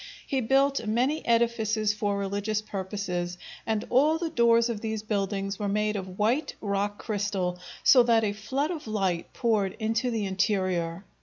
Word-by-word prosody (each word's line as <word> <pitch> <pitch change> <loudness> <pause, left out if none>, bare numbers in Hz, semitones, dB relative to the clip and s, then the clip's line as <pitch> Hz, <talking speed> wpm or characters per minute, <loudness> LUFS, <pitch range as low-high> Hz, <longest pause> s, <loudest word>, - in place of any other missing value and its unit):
He 270 -1 0
built 270 0 +2
many 255 +8 +1
edifices 225 -2 +2
for 205 -1 -1
religious 200 +2 -1
purposes, 190 -3 -4 0.3
and 220 0 0
all 295 +6 +4
the 330 -1 -3
doors 235 -1 +4
of 225 -3 -4
these 220 -1 -3
buildings 195 -2 -2
were 205 -1 -1
made 210 +1 0
of 190 -2 -6
white 235 +9 +1
rock 200 0 -1
crystal, 195 -4 -2 0.2
so 255 - +7
that 230 -2 +3
a 205 -1 0
flood 265 +9 -2
of 315 -8 -6
light 190 -5 -1
poured 215 -6 0
into 225 +3 0
the 225 -3 -1
interior. 185 -3 0
215 Hz, 160 wpm, -27 LUFS, 195-235 Hz, 0.3 s, so